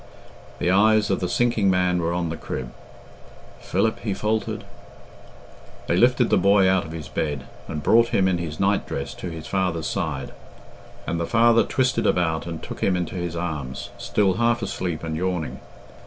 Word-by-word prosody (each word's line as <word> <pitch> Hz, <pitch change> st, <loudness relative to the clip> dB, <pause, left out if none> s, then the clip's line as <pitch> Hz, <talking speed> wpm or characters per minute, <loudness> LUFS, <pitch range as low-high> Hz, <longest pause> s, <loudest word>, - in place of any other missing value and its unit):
The 90 Hz, -, +1 dB
eyes 105 Hz, +1 st, +4 dB
of 95 Hz, -, +1 dB
the 90 Hz, -, -2 dB
sinking 115 Hz, -5 st, +2 dB
man 90 Hz, -1 st, +2 dB
were 85 Hz, 0 st, 0 dB
on 85 Hz, -1 st, -1 dB
the 80 Hz, -, -3 dB
crib. 60 Hz, -5 st, -6 dB, 0.9 s
"Philip," 110 Hz, -, 0 dB
he 100 Hz, -4 st, -2 dB
faltered. 110 Hz, +1 st, -1 dB, 1.2 s
They -, -, +1 dB
lifted 120 Hz, +4 st, +3 dB
the -, -, +5 dB
boy 100 Hz, -1 st, +5 dB
out 95 Hz, -2 st, +2 dB
of 80 Hz, -, -8 dB
his 80 Hz, -3 st, -6 dB
bed, 75 Hz, -2 st, -2 dB, 0.2 s
and 75 Hz, -, -5 dB
brought 115 Hz, +1 st, +5 dB
him 95 Hz, -4 st, +2 dB
in 90 Hz, -2 st, +1 dB
his 80 Hz, -3 st, -5 dB
night 100 Hz, +1 st, +1 dB
dress 70 Hz, 0 st, -4 dB
to 90 Hz, -, -6 dB
his 80 Hz, -1 st, -7 dB
father's 90 Hz, -4 st, -1 dB
side; -, -, -3 dB, 0.7 s
and 85 Hz, -, -2 dB
the 85 Hz, -, -2 dB
father 115 Hz, 0 st, +5 dB
twisted 130 Hz, 0 st, +1 dB
about 80 Hz, -2 st, +1 dB
and 85 Hz, -2 st, -6 dB
took -, -, -7 dB
him 95 Hz, -2 st, +2 dB
into 90 Hz, -, -3 dB
his 90 Hz, -2 st, -3 dB
arms, 75 Hz, -7 st, -4 dB
still 100 Hz, -2 st, +1 dB
half 120 Hz, 0 st, +2 dB
asleep 90 Hz, -5 st, -3 dB
and 80 Hz, -1 st, -3 dB
yawning. 90 Hz, -1 st, -2 dB
90 Hz, 180 wpm, -24 LUFS, 80-105 Hz, 1.2 s, the